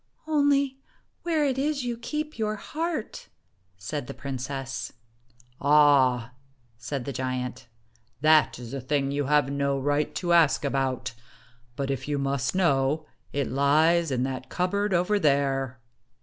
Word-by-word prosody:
" - - -44
Only 285 -3 +2 0.4
where 320 -3 +1
it 265 -2 0
is 285 -1 0
you 240 -1 -2
keep 300 +5 -5
your 215 -1 0
heart," 315 +3 -4 0.5
said 125 +8 -5
the - - -7
princess. 135 -2 -5 0.7
"Ah!" 135 -5 +4 0.4
said 125 +3 -5
the 140 - -4
giant. 130 -1 -4 0.2
" - - -37
That 155 -1 +5
is 120 0 -9
a 135 - -3
thing 135 +1 0
you 145 0 -1
have 145 -1 +2
no 140 -1 0
right 145 +2 0
to 175 -1 0
ask 160 -4 +4
about; 130 -3 -1 0.6
but 140 +1 -2
if 135 0 -4
you 145 -1 -1
must 140 +1 -1
know, 155 -4 +2 0.3
it 140 -1 -2
lies 155 +5 +3
in 125 -2 0
that 130 0 -4
cupboard 200 +3 0
over 180 +4 +2
there." 135 - +1
140 Hz, 150 wpm, -26 LUFS, 135-185 Hz, 0.7 s, That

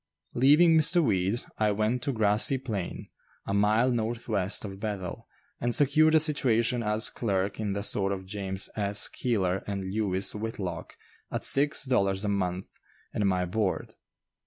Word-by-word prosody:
Leaving 150 +6 +5
Mr. 160 +3 +5
Weed, 95 -1 0 0.2
I 110 -1 +2
went 110 +4 -1
to 140 - -1
Grassy 110 +3 +2
Plain, 110 -9 -6 0.4
a 100 - -3
mile 105 +5 +2
northwest 110 -4 -1
of 95 -1 -8
Bethel, 100 -4 -5 0.3
and 120 0 -1
secured 155 +3 +4
a - - +6
situation 125 -6 +2
as 105 0 -1
clerk 100 -3 -2
in 105 -2 -2
the 100 0 -4
store 100 -1 +1
of 95 -1 -5
James 95 -1 -4
S. 100 -1 +2
Keeler 95 -6 -2
& - - -24
Lewis 100 -1 -2
Whitlock 100 -6 -6 0.4
at - - -4
six 145 +1 +3
dollars 100 -6 0
a - - -1
month 95 -2 -2 0.5
and 105 - 0
my 90 -1 0
board. 95 +1 -2
105 Hz, 155 wpm, -27 LUFS, 95-120 Hz, 0.5 s, a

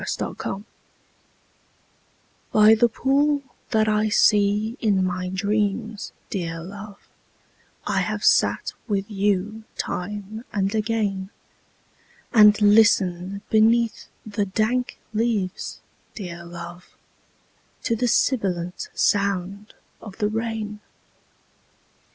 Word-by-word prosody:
THE - - -4
POOL 195 - -5 1.9
By 215 0 +7
the 235 +2 +4
pool 280 +4 +1 0.3
that 220 -2 +2
I 215 0 +2
see 210 +1 +3
in 200 -4 +2
my 180 0 -2
dreams, 205 +2 -1 0.2
dear 165 -4 -3
love, 200 +2 -9 0.9
I - - 0
have - - -2
sat - - +3
with 200 -3 0
you 205 +2 0
time 205 +4 -4
and 195 0 0
again; 210 -3 -1 1.0
And 210 -2 +7
listened 200 -3 +3
beneath 225 +1 +3 0.2
the 205 -1 -2
dank 225 +6 0 0.2
leaves, 215 -4 -2 0.3
dear 170 -4 -7
love, 175 +1 -10 0.9
To 230 - +1
the 245 +2 0
sibilant 185 -8 0
sound 200 +1 0 0.3
of 200 -3 -10
the 210 -2 0
rain. 220 -1 -3
210 Hz, 100 wpm, -23 LUFS, 195-220 Hz, 1.9 s, By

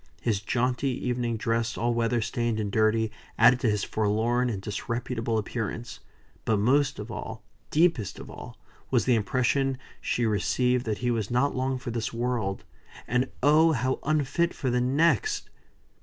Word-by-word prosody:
His 105 -4 0
jaunty 125 +5 0 0.2
evening 120 -2 -1
dress, 115 +1 -1
all 120 0 +1
weather 115 0 +1
stained 115 0 -1
and 105 -2 -2
dirty, 110 +1 +2 0.3
added 120 +2 +6
to 120 - +2
his 105 -2 0
forlorn 110 +4 +1
and 105 -5 -3
disreputable 115 +3 -3
appearance; 110 +1 -4 0.4
but 110 - +2
most 135 +7 +2
of - - -7
all - - -6 0.3
deepest 150 - +2
of - - -9
all - - -10 0.3
was - - +2
the 125 - +4
impression 130 +4 +1 0.2
she 120 - 0
received 125 +3 +1
that 105 -2 0
he 120 - +2
was 110 -4 -1
not 125 +4 +1
long 130 0 0
for 125 -1 -5
this 115 -1 -2
world; 115 -5 -2 0.4
and 125 +3 +1
oh! 155 +3 +5
how 130 0 0
unfit 155 +3 0
for 130 -4 -1
the 125 0 +2
next! 165 - +1
120 Hz, 160 wpm, -27 LUFS, 110-130 Hz, 0.4 s, added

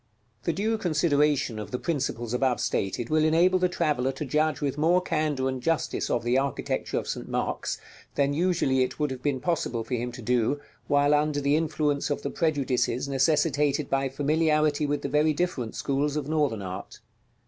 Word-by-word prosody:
§ - - -45 0.4
XLVIII. 120 - -29
The 170 - +1
due 220 +5 0
consideration 150 - +1
of 105 - -6
the 125 - -2
principles 125 -7 -2
above 125 0 +1
stated 105 +6 -2
will 155 0 +3
enable 170 +4 +4
the 180 0 +2
traveller 150 -7 0
to 140 +3 -5
judge 155 +3 +1
with 140 -3 -1
more 165 +4 +3
candor 155 -6 -1
and 130 -1 -3
justice 165 +4 -1
of 120 - 0
the 120 +2 +2
architecture 135 -1 -2
of - - -3
St. - - -4
Mark's - - -2 0.4
than 140 0 +2
usually 160 -5 +2
it 130 - -1
would 150 -2 0
have 130 -1 -6
been 140 -2 0
possible 130 -7 -1
for 125 - -6
him 120 0 -2
to 120 - -9
do 125 +4 +1 0.3
while 145 +1 +3
under 150 0 +2
the 140 +1 +2
influence 150 -2 0
of 145 - -2
the - - -2
prejudices 135 -5 0
necessitated 145 +1 +1
by 135 0 +1
familiarity 150 +1 +1
with 145 0 -1
the - - -1
very 150 +1 +2
different 145 -9 -2
schools 140 +1 -1
of 150 -2 -2
Northern 145 -9 0
art. 95 0 -7
145 Hz, 190 wpm, -27 LUFS, 130-155 Hz, 0.4 s, enable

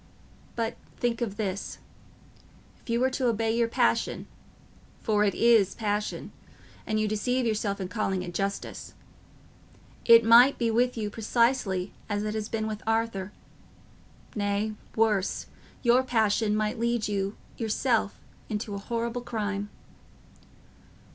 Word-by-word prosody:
But 230 0 -2 0.2
think 240 -1 -1
of 205 -4 -2
this: 200 -2 -3 1.0
if - - -18
you 230 0 +1
were 260 +1 +2
to 255 -1 0
obey 225 -1 +1
your 235 0 +2
passion—for 230 -2 -2
it 200 -3 +1
is 230 -5 +4
passion, 210 -1 -2 0.6
and 215 0 0
you 215 - +1
deceive 245 +4 0
yourself 210 -3 -1
in 190 - -3
calling 190 -2 -1
it 175 -1 -7
justice—it 195 +2 -4 1.3
might 240 +4 +7
be 230 -2 +1
with 245 +2 +1
you 210 -2 -2
precisely 225 -4 +1 0.2
as 205 0 -1
it 210 0 -2
has 215 -1 -3
been 220 -1 -2
with 215 -1 -4
Arthur; 225 -4 0 1.0
nay, 205 +1 0 0.2
worse; 215 -4 +1 0.4
your 245 +1 +5
passion 220 -3 +1
might 215 +2 -1
lead 235 -1 0
you 200 0 -2 0.2
yourself 225 -1 0 0.3
into 210 0 -3
a 200 - -4
horrible 235 +3 -3
crime." 205 -4 -3
220 Hz, 130 wpm, -27 LUFS, 205-235 Hz, 1.3 s, might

